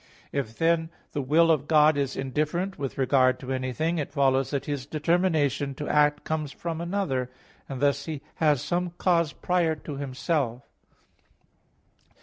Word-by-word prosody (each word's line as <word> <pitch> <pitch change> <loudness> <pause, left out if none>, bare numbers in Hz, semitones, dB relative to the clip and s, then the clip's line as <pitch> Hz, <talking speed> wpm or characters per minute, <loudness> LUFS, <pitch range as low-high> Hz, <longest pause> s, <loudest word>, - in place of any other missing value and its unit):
If, 115 -5 -3
then, 165 0 +2 0.2
the 145 - -2
Will 160 +5 +4
of 150 -2 +1
God 155 -1 +5
is 140 -2 -1
indifferent 155 +8 -2
with 135 -2 -4
regard 130 -1 +3
to 130 0 -5
anything, 130 +6 -1
it 145 - -3
follows 135 -2 +2
that 140 -1 -2
His 140 -2 -4
determination 155 -3 +1
to 150 - -5
act 150 0 +3
comes 155 -3 -2
from 165 +1 -5
another; 170 -9 -1 0.4
and 135 -2 -5
thus 140 0 +2
He 155 -3 -5
has 150 -5 +2
some 175 0 -1
cause 170 -4 +2
prior 175 -3 0
to 150 -2 -7
Himself. 135 -2 -2
150 Hz, 150 wpm, -26 LUFS, 135-165 Hz, 0.4 s, God